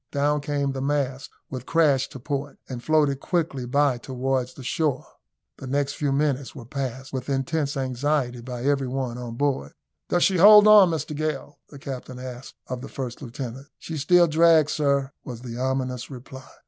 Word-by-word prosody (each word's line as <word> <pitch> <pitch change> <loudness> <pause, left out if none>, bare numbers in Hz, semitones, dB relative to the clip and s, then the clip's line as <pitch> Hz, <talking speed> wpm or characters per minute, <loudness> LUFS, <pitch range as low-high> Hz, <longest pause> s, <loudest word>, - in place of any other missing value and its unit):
Down 145 +1 +1
came 145 -1 -1
the 135 0 -4
mast 135 -2 -1 0.2
with 130 -1 -6
crash 150 -6 +3
to 135 - -9
port, 140 +2 -4
and 125 -2 -7
floated 150 -3 +2
quickly 155 -7 -2
by 140 -1 +2
towards 130 0 -2
the 135 - -10
shore. 145 0 -1 0.5
The 135 - -8
next 140 +1 0
few 145 -2 -1
minutes 140 -1 0
were 120 - -9
passed 135 +1 -5
with 130 +1 -4
intense 140 +2 -1
anxiety 130 -1 -1
by 125 0 -6
every 140 -1 +1
one 125 -2 -3
on 120 -2 -6
board. 130 - -1 0.4
"Does 175 - +2
she 190 - +3
hold 210 +3 +9
on, 210 -4 +8
Mr 155 -2 -3
Gale?" 150 -1 -4
the 145 - -11
captain 130 -2 -7
asked 125 0 -8
of 125 -1 -5
the 135 - -8
first 125 -2 -6
lieutenant. 130 +1 -7
"She 165 - -7
still 175 +5 +5
drags, 160 -1 +4
sir," 140 -2 +1
was 120 -3 -8
the 120 -1 -7
ominous 130 -1 -2
reply. 130 0 -10
135 Hz, 180 wpm, -25 LUFS, 130-145 Hz, 0.5 s, hold